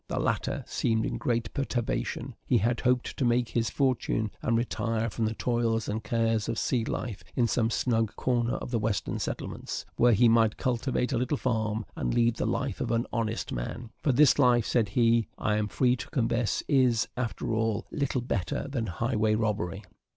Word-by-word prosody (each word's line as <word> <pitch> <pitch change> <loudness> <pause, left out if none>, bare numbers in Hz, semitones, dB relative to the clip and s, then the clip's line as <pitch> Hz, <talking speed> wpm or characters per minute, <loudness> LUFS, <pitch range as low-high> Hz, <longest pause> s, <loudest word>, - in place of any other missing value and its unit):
The - - -3
latter - - -1
seemed 110 -1 0
in - - -3
great 115 -2 -1
perturbation; 130 -1 -2
he 125 - +4
had 115 +3 +1
hoped 125 -1 +1
to - - 0
make 120 -1 +2
his 115 -1 0
fortune, 125 -5 0
and 115 - +1
retire 115 -1 -1
from 115 - -1
the 110 +1 -2
toils 115 -2 0
and 110 +1 -3
cares 115 -1 0
of - - +1
a - - -6
sea 120 0 +1
life 110 -2 -4
in 120 - +3
some 115 0 +1
snug 115 -3 0
corner 120 -2 0
of - - -6
the 115 - +1
Western 105 -2 -1
settlements, - - -4
where 120 0 +5
he 120 +3 +5
might 115 -1 +4
cultivate 125 +1 0
a 120 - +1
little 130 +4 0
farm, 110 -4 -1
and - - -1
lead 115 -1 +3
the - - -1
life - - -2
of - - -1
an 115 +1 +1
honest 115 -2 -2
man; 115 - -5
"for 140 - +2
this 140 +2 +5
life," 120 -4 +4
said 115 -5 +1
he, 115 +1 +3
"I 105 - 0
am 105 0 0
free 125 +3 +2
to 130 +3 -7
confess, 115 -3 0
is, 125 -4 +3
after 120 -2 -2
all, 110 0 0
little 140 -4 -1
better 100 -2 -2
than 130 -5 -2
highway 110 +3 0
robbery." 105 -3 -1
115 Hz, 195 wpm, -28 LUFS, 110-125 Hz, -, where